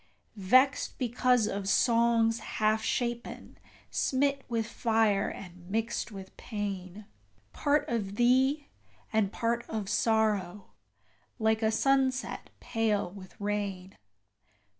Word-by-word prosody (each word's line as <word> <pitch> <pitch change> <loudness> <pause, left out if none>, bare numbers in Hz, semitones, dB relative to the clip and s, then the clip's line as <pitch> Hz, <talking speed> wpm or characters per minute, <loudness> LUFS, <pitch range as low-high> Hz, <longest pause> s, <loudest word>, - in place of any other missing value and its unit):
Vexed 255 +8 +3
because 250 -1 +2
of 200 -2 -3
songs 230 0 +3
half 215 0 0
shapen, 240 +1 -3 0.3
smit 275 +1 +1
with 230 -2 0
fire 220 -3 +1
and 180 -1 -10
mixed 225 +3 -2
with 190 -2 -10
pain: 200 -2 -5 0.5
Part 290 0 +1
of 205 -4 -2
thee, 265 +5 +3 0.5
and 215 -3 +2
part 235 +2 -1
of 210 -3 -3
Sorrow, 210 -4 0 0.7
like 220 -1 +1
a 220 - +3
sunset 265 +3 0
pale 215 -5 -1
with 190 -1 -13
rain. 200 -2 -3
220 Hz, 105 wpm, -29 LUFS, 200-240 Hz, 0.7 s, Vexed